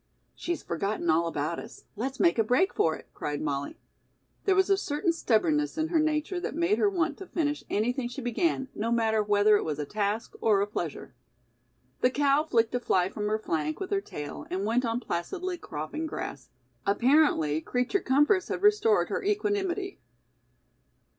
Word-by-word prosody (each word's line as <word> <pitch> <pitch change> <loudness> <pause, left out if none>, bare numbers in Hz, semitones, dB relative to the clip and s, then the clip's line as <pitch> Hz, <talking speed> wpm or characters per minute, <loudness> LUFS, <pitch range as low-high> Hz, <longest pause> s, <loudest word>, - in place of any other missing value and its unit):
"She's 345 0 -4
forgotten 175 0 -1
all 165 +2 +2
about 160 +1 -2
us. - - -11
Let's 265 +5 -4
make 340 -9 +3
a - - +5
break 250 - +2
for 160 -1 +2
it," - - -13
cried 145 -1 -3
Molly. 140 -2 -3 0.7
There 385 - +4
was 380 -1 +4
a - - +7
certain 335 -1 0
stubbornness 300 +2 +1
in 315 0 0
her 330 -2 +2
nature 310 +3 0
that 350 - -4
made 340 +6 +2
her 415 - +4
want 340 -4 -1
to 385 - -8
finish 295 -3 -1
anything 245 +4 0
she 245 - -7
began 265 +3 0
no 225 +2 -2
matter 220 -2 +2
whether 205 0 +4
it - - -2
was 150 -2 -3
a 150 - -3
task 210 +5 -2
or 210 -3 +4
a 200 - +2
pleasure. 170 -9 -5 0.9
The 250 - +4
cow 280 +2 +2
flicked 230 -6 +1
a 245 - +1
fly 185 -6 +1
from 210 0 -3
her 215 +1 +1
flank 155 -7 -2
with 385 - -5
her 395 -1 +1
tail 150 - -7
and 190 +2 -2
went 240 +4 +1
on 230 +1 -1
placidly 355 - -3
cropping 155 - -5
grass. 140 - -6 0.3
Apparently, 205 - +3
creature 250 - 0
comforts 295 +8 +3
had 375 - -4
restored 420 +1 +4
her - - -1
equanimity. 400 -2 -1
250 Hz, 180 wpm, -28 LUFS, 205-340 Hz, 0.9 s, a